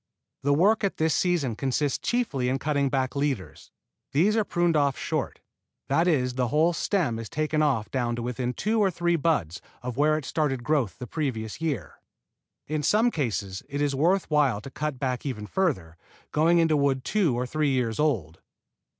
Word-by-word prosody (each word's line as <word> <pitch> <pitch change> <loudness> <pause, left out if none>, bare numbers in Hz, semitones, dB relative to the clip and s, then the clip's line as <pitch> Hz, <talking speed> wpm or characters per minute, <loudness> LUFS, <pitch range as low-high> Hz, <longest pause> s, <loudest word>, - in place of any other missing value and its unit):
The 140 +1 +2
work 205 +8 +3
at 200 - 0
this 160 -1 +2
season 165 -10 +1
consists 135 +3 0
chiefly 155 - 0
in 130 - +1
cutting 140 -1 0
back 130 -1 -1
leaders. 130 - -3 0.4
These 185 +10 +3
are 220 - +3
pruned 175 -3 +1
off 140 -3 +2
short, - - -3 0.5
that 165 +6 +3
is 125 -7 +2
the 125 -1 0
whole 155 +6 +3
stem 165 - 0
is 115 - -7
taken 155 0 0
off 135 -8 +1
down 120 -3 -1
to 120 - -4
within 125 0 -3
two 220 +2 0
or 200 -2 +4
three 175 -1 0
buds 140 - 0 0.2
of 125 -1 -5
where 155 +1 +3
it 155 - -5
started 135 -6 -1
growth 140 -8 0
the 125 - -6
previous 120 -5 -3
year. 130 - -3 0.7
In 155 0 -1
some 220 - +3
cases 105 - -2
it 140 0 -3
is 145 -1 +1
worth 175 +8 +2
while 145 -8 +3
to 135 - -9
cut 150 +1 -3 0.3
even 115 -7 -4
further 105 - -1
back, - - -29
going 165 +3 +3
into 165 -2 +3
wood 140 -2 +1
two 170 - +1
or 125 - -1
three 150 +3 0
years 125 -4 0
old. 110 - 0
145 Hz, 185 wpm, -26 LUFS, 125-160 Hz, 0.7 s, or